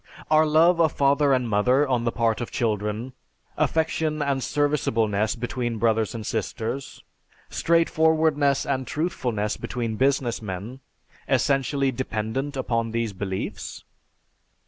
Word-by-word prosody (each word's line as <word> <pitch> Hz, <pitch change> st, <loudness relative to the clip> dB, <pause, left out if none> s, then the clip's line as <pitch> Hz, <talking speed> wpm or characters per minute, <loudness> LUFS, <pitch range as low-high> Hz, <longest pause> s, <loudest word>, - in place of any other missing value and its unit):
Are 155 Hz, 0 st, +5 dB
love 165 Hz, +3 st, +4 dB
of 160 Hz, -2 st, +3 dB
father 140 Hz, +1 st, +3 dB
and 130 Hz, -2 st, +2 dB
mother 125 Hz, +7 st, +3 dB
on 125 Hz, -3 st, 0 dB
the 115 Hz, -, +1 dB
part 115 Hz, -1 st, 0 dB
of 120 Hz, -, -4 dB
children, 110 Hz, +2 st, -2 dB, 0.4 s
affection 160 Hz, -1 st, 0 dB
and 140 Hz, -2 st, 0 dB
serviceableness 115 Hz, -8 st, 0 dB
between 120 Hz, -1 st, -3 dB
brothers 110 Hz, 0 st, +1 dB
and 110 Hz, -2 st, -5 dB
sisters, 115 Hz, +5 st, -4 dB, 0.5 s
straight 165 Hz, 0 st, +2 dB
forwardness 155 Hz, -3 st, +2 dB
and 130 Hz, -2 st, -2 dB
truthfulness 125 Hz, -10 st, -2 dB
between 115 Hz, -3 st, -3 dB
business 135 Hz, -3 st, +1 dB
men, 105 Hz, +5 st, -6 dB, 0.5 s
essentially 135 Hz, 0 st, +1 dB
dependent 130 Hz, +3 st, -3 dB
upon 115 Hz, -3 st, -1 dB
these 115 Hz, -2 st, -2 dB
beliefs? 95 Hz, 0 st, -5 dB
125 Hz, 125 wpm, -24 LUFS, 110-145 Hz, 0.5 s, Are